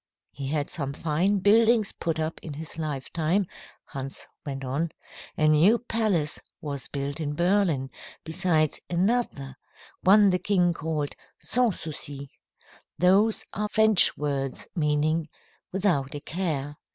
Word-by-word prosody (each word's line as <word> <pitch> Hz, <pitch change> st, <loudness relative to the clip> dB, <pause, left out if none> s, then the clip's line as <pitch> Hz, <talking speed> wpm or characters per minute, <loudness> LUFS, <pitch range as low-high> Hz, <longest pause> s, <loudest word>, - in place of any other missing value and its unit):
"He 140 Hz, -1 st, -6 dB
had 145 Hz, 0 st, -1 dB
some 140 Hz, -3 st, -4 dB
fine 175 Hz, +7 st, 0 dB
buildings 220 Hz, +1 st, +4 dB
put 165 Hz, -1 st, -3 dB
up 160 Hz, +1 st, -3 dB
in 150 Hz, -3 st, -7 dB
his 160 Hz, +1 st, -7 dB
lifetime," 155 Hz, +5 st, -1 dB, 0.4 s
Hans 135 Hz, 0 st, -7 dB, 0.2 s
went 135 Hz, -2 st, -5 dB
on. 145 Hz, +6 st, -1 dB, 0.5 s
"A 155 Hz, -, +3 dB
new 160 Hz, +10 st, +5 dB
palace 215 Hz, -10 st, -1 dB, 0.2 s
was 140 Hz, -3 st, -5 dB
built 140 Hz, +1 st, -4 dB
in 145 Hz, -2 st, -3 dB
Berlin, 170 Hz, -7 st, +1 dB, 0.3 s
besides 160 Hz, -2 st, 0 dB
another 175 Hz, -, -1 dB, 0.4 s
one 200 Hz, +1 st, +6 dB
the 180 Hz, -, +1 dB
king 180 Hz, -4 st, +2 dB
called 155 Hz, -3 st, -3 dB, 0.3 s
'Sans 245 Hz, -6 st, +1 dB
Souci.' 140 Hz, -3 st, -6 dB, 0.7 s
Those 200 Hz, +5 st, +3 dB
are 210 Hz, +1 st, -2 dB
French 220 Hz, -3 st, +6 dB
words 140 Hz, -3 st, -3 dB
meaning, 155 Hz, 0 st, +1 dB, 0.4 s
'Without 175 Hz, -8 st, 0 dB
a -, -, -4 dB
Care.' 145 Hz, -3 st, -3 dB
160 Hz, 125 wpm, -26 LUFS, 145-195 Hz, 0.7 s, one